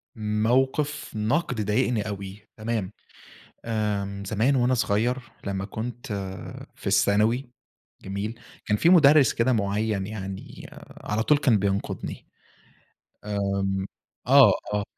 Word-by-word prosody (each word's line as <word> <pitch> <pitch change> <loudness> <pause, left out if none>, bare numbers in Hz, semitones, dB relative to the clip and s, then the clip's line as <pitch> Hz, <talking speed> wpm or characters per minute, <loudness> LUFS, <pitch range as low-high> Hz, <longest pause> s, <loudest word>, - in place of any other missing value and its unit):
موقف 130 +7 0
نقد 115 +2 0
ضايقني 110 0 +1
أوي، 100 0 -7
تمام، 110 -3 -2 0.7
آمم 100 -3 -2
زمان 110 +7 +1
وأنا 125 0 +3
صغيّر، 115 +2 +1 0.3
لما 95 -1 -2
كنت 120 +5 -6 0.7
في - - -15
الثانوي، 115 +5 +2 0.5
جميل؟ 105 +5 -5 0.3
كان 105 - +2
في 165 - +3
مُدرّس 150 -5 +6
كده 120 +3 +1
معيّن 105 -2 0
يعني 95 -2 -7 0.4
على 105 +1 0
طول 150 +5 +3
كان 130 -7 +3
بينقدني، 100 0 -3 2.0
آمم 135 - +4
آه، 130 -7 +9 0.2
آه 105 0 0
110 Hz, 110 wpm, -25 LUFS, 100-125 Hz, 2.0 s, آه